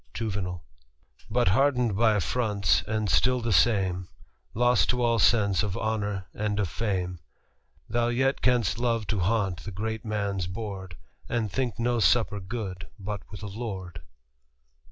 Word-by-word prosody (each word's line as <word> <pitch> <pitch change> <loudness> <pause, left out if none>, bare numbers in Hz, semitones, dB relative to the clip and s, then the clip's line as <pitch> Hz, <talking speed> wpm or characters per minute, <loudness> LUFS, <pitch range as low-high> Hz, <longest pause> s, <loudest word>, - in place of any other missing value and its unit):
Juv. 95 -6 -3 0.4
'* - - -29
But 120 -6 +4
hardened 125 0 +2
by 110 0 +4
affronts, 100 - +1
and 110 -1 -1
still 125 +9 +3
the 115 -2 0
same, 95 -5 +2 0.5
Lost 120 +2 +3
to 125 -1 +1
all 115 -1 +2
sense 100 -3 +4
of 100 -3 -2
honour 105 -3 -2
and 105 0 -1
of 100 -5 0
fame, 90 -3 -2 0.7
Thou 120 +1 +1
yet 130 +3 +1
canst 120 -4 +2
love 115 -3 0
to 105 - -1
haunt 95 -1 +1
the - - -6
great 110 +3 -4
man's 100 -4 -2
board, 95 -3 -6 0.3
And 115 -4 -1
think 125 +1 -1
no 120 0 +1
supper 110 -2 +3
good 95 -4 -5
but 100 0 -5
with 100 -2 -9
a - - -4
lord.' 95 -6 -6
105 Hz, 155 wpm, -27 LUFS, 95-115 Hz, 0.7 s, But